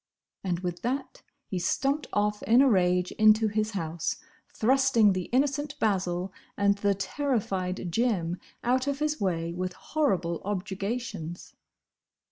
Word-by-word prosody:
And 180 -2 -1
with 175 -1 -4
that 265 +3 -3 0.2
he 185 - -3
stumped 275 - 0
off 210 0 0
in 240 +4 +5
a - - +5
rage 180 -5 +2
into 215 0 +6
his 215 +1 -1
house, 160 -1 -2 0.4
thrusting 240 -3 +4
the 185 -1 -2
innocent 280 +2 0
Basil 185 -4 0 0.2
and 200 0 +3
the 200 -1 +2
terrified 195 - -2
Jim 180 -5 0 0.2
out 255 +2 +1
of 280 -1 0
his 300 -3 -1
way 170 -3 -1
with 180 +1 -3
horrible 185 - -1
objurgations. 195 -2 -4
205 Hz, 130 wpm, -28 LUFS, 180-250 Hz, 0.4 s, into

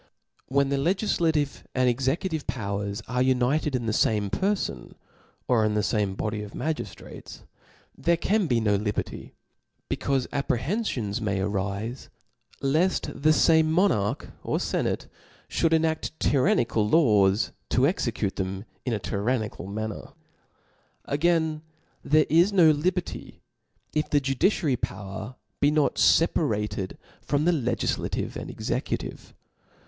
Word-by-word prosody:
When 140 +1 +2
the 140 - +1
legiflative 160 -3 +1
and 130 0 +3
executive 140 +6 0
powers 100 -4 -3
are 125 +1 0
united 130 +3 +2
in 120 -2 -2
the 110 - 0
fame 105 -2 +1
perfon, 190 - -2 0.5
or 120 -3 +3
in 105 0 +1
the 105 - +1
fame 105 -4 0
body 105 +1 -2
of 105 -1 -8
magiftrates, 160 0 -6 0.5
there 170 0 +1
can 195 +2 +1
be 120 -4 +2
no 105 -2 +2
liberty; 105 0 -4 0.6
becaufe 135 -2 0
ap 140 - -2
prehenfions 120 - -1
may 100 -3 -1
arife, 100 +5 -3 0.5
left 155 +3 +1
the 155 +2 +5
fame 160 0 +4
monarch 160 - +1
or - - -1
fenateifaould - - -1 0.4
enadk 160 -1 +1
tyrannical 120 -7 +2
laws, 105 -9 +4 0.2
to 125 - +3
execute 120 - -1
them 95 +1 -3 0.2
in 125 - -1
a 105 - -1
tyrannical 105 0 -2
manner.. 110 +1 -5 0.9
Again, 160 +1 +1 0.4
there 155 0 +4
is 170 +6 +4
no 175 -5 +6
liberty, 175 +4 -3 0.5
if 150 0 0
the 145 - +3
judiciary 135 +1 +1
power. 105 +5 -5 0.2
be 145 - +4
not 150 -1 +1
feparated 105 - +2 0.3
frem 145 +1 0
the 175 - +5
legiAative 130 -8 -1
and - - -6
executive. - - -4
130 Hz, 125 wpm, -26 LUFS, 105-160 Hz, 0.9 s, no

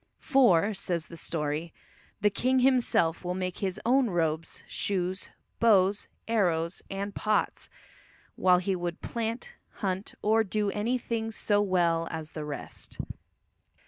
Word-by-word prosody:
"For," 220 - +4
says 175 -4 -1
the 170 - -11
story, 155 0 -3 0.5
"the 210 0 +4
king 255 +6 +1
himself 245 -11 +3
will 180 0 -2
make 185 -1 -3
his 190 0 -2
own 255 0 +4
robes, 165 -2 -1
shoes, 185 -1 -2 0.3
bows, 200 -3 +4 0.2
arrows, 175 -6 +1
and 200 +1 -4
pots," 215 +1 0 0.7
while 180 -1 +5
he 185 +2 0
would 175 -1 -4
"plant, 230 +1 -3 0.2
hunt, 190 0 -3
or 220 +1 +4
do 210 0 -1
any 225 +5 0
thing 230 -2 -3
so 205 -1 +1
well 170 -4 +2
as 160 -1 -6
the 155 -1 -5
rest." 145 -1 -6
190 Hz, 135 wpm, -29 LUFS, 170-220 Hz, 0.7 s, while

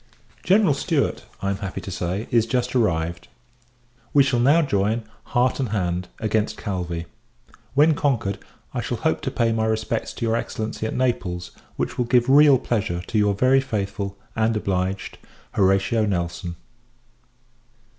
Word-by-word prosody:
General 190 -2 +4
Stewart, 140 -2 -1 0.2
I 100 - +1
am 100 - -2
happy 95 -2 -5
to 95 - -7
say, 90 +4 -3
is 115 -1 +3
just 125 0 -1
arrived. 85 -7 0 0.9
We 140 - +8
shall 130 -3 +1
now 145 +7 +5
join, 110 -3 0 0.2
heart 125 +1 +1
and 130 -4 -1
hand, 90 -3 -1
against 110 -1 -1
Calvi. 90 -4 -3 0.7
When 150 +3 +6
conquered, 120 -9 0 0.3
I - - -1
shall - - -3
hope - - 0
to - - -2
pay 115 -1 +1
my 110 0 +1
respects 110 +1 -1
to 115 - -3
your 115 0 +1
Excellency 110 -1 -3
at - - -4
Naples; 90 -9 -1 0.2
which - - -3
will 125 - +2
give 120 0 +3
real 145 -1 +7
pleasure 100 -8 -2
to 110 - -2
your 105 -1 +2
very 130 +5 +4
faithful, 100 -5 -3 0.2
and 110 0 +1
obliged, 95 -1 -2 0.3
HORATIO 100 +3 +2
NELSON. 85 -2 -2
110 Hz, 155 wpm, -23 LUFS, 95-125 Hz, 0.9 s, We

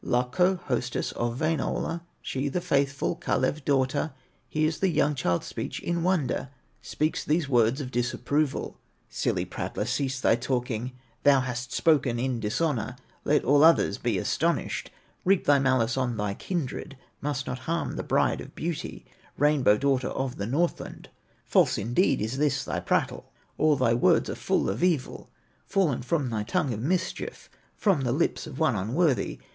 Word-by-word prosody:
Lakko, 135 +10 +1
hostess 125 -1 -2
of 120 0 -2
Wainola, 165 +1 -1 0.2
She 135 +2 -2
the 160 - -1
faithful 140 -5 0
Kalew 135 +3 -1
daughter, 135 +2 +1 0.4
Hears 155 +1 0
the 195 - +2
young 150 -3 +2
child's 90 -11 0
speech - - -5
in 170 0 -2
wonder, 170 -7 0 0.3
Speaks 155 +1 -1
these 155 0 +1
words 120 0 +3
of 130 -2 -6
disapproval: 130 +4 -1 0.3
"Silly - - -1
prattler, - - -4
cease 130 +2 -1
thy 115 - +4
talking, 125 -1 -2 0.3
Thou 140 -2 +5
hast 125 -1 -4
spoken 145 -7 +2
in 125 -1 -1
dishonor; 125 +3 -1 0.3
Let 150 - +2
all 145 +2 +5
others 160 -10 +5
be 120 -5 0
astonished, - - -1 0.3
Heap 195 0 +3
thy 145 -1 +5
malice 130 -3 +2
on 125 -3 -1
thy 105 -1 -1
kindred, 150 - -4 0.2
must 145 -2 -2
not 125 - -4
harm 170 0 -1
the - - -2
Bride - - +1
of - - -11
Beauty, 165 -1 -4 0.3
Rainbow 145 -7 +4
daughter 135 -1 +1
of 135 -1 -3
the 100 - -3
Northland. 165 +8 -2 0.4
False - - +3
indeed 120 - +1
is 110 +5 -2
this 150 -2 +1
thy - - -2
prattle, - - -1 0.3
All 155 -1 +4
thy 130 -4 +2
words 120 - +3
are - - -2
full - - 0
of 100 - -2
evil, 165 -8 0 0.4
Fallen 175 -10 +1
from 130 0 -1
thy 110 -2 -1
tongue 140 - 0
of 105 - -5
mischief, 175 +8 -2 0.3
From 195 - +2
the 125 -2 0
lips 155 +4 0
of 140 -4 -8
one 155 -7 +2
unworthy. 130 - 0
135 Hz, 160 wpm, -27 LUFS, 120-155 Hz, 0.4 s, Thou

